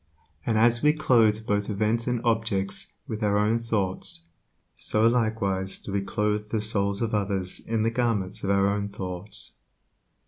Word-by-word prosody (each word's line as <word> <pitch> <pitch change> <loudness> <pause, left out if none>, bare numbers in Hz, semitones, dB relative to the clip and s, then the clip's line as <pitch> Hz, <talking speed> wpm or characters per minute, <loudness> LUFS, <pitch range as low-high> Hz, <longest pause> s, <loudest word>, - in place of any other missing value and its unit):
And 110 - +2
as 120 +2 +4
we 150 0 +5
clothe 115 -8 +3
both 105 0 0
events 110 +3 0
and 125 -2 0
objects 110 -4 0 0.2
with 110 0 -5
our 105 -1 +2
own 110 +3 +2
thoughts, 100 -7 -2 0.5
so 110 +1 +1
likewise 110 -5 +1
do 100 - -7
we 100 - +1
clothe 105 +1 -1
the 110 - 0
souls 100 -1 0
of 110 - -2
others 100 -3 -1
in 110 -1 -1
the 115 - +1
garments 115 -6 -1
of 100 - -1
our 100 +1 +2
thoughts. 95 0 -2
105 Hz, 160 wpm, -26 LUFS, 100-115 Hz, 0.5 s, we